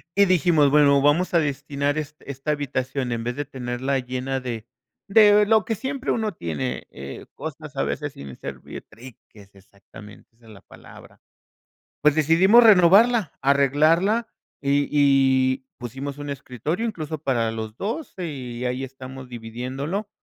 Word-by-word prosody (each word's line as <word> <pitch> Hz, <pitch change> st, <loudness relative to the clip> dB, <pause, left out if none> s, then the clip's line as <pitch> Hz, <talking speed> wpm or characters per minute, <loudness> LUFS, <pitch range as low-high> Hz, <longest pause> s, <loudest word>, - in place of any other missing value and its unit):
y 200 Hz, 0 st, +5 dB
dijimos 165 Hz, -5 st, +3 dB
bueno, 140 Hz, -1 st, +5 dB
vamos 150 Hz, +7 st, +2 dB
a 170 Hz, -, +5 dB
destinar 145 Hz, -1 st, -2 dB
es 155 Hz, 0 st, -5 dB
esta 140 Hz, +2 st, -5 dB
habitación 135 Hz, -3 st, -2 dB
en 115 Hz, -1 st, -3 dB
vez 120 Hz, 0 st, -2 dB
de 145 Hz, -, -3 dB
tenerla 130 Hz, 0 st, -3 dB
llena 130 Hz, +1 st, -3 dB
de 120 Hz, -4 st, -6 dB, 0.4 s
de 210 Hz, 0 st, +6 dB
lo 220 Hz, -1 st, +3 dB
que 225 Hz, -, -1 dB
siempre 265 Hz, +5 st, -3 dB
uno 220 Hz, -3 st, -1 dB
tiene, 80 Hz, -, -4 dB
eh, 70 Hz, 0 st, -9 dB
cosas -, -, -8 dB
a -, -, 0 dB
veces -, -, -3 dB
sin 70 Hz, -2 st, -10 dB
servir -, -, -9 dB
triques, 105 Hz, -3 st, -16 dB
exactamente, 100 Hz, +2 st, -16 dB
esa 115 Hz, 0 st, -24 dB
es 110 Hz, -, -14 dB
la 100 Hz, -3 st, -14 dB
palabra. -, -, -16 dB, 0.8 s
Pues 150 Hz, 0 st, +4 dB
decidimos 180 Hz, +10 st, +5 dB
renovarla, 205 Hz, 0 st, +5 dB
arreglarla 155 Hz, -, +3 dB, 0.3 s
y 140 Hz, 0 st, +1 dB
y 135 Hz, -2 st, +3 dB
pusimos 135 Hz, +4 st, -6 dB
un 145 Hz, 0 st, -6 dB
escritorio 140 Hz, -, -4 dB
incluso 160 Hz, -8 st, -4 dB
para 120 Hz, -6 st, 0 dB
los 110 Hz, -1 st, -6 dB
2 230 Hz, -, -4 dB
y 130 Hz, -8 st, -5 dB
ahí 125 Hz, +1 st, -2 dB
estamos 130 Hz, 0 st, -10 dB
dividiéndolo 130 Hz, -, -5 dB
140 Hz, 150 wpm, -23 LUFS, 125-170 Hz, 0.8 s, de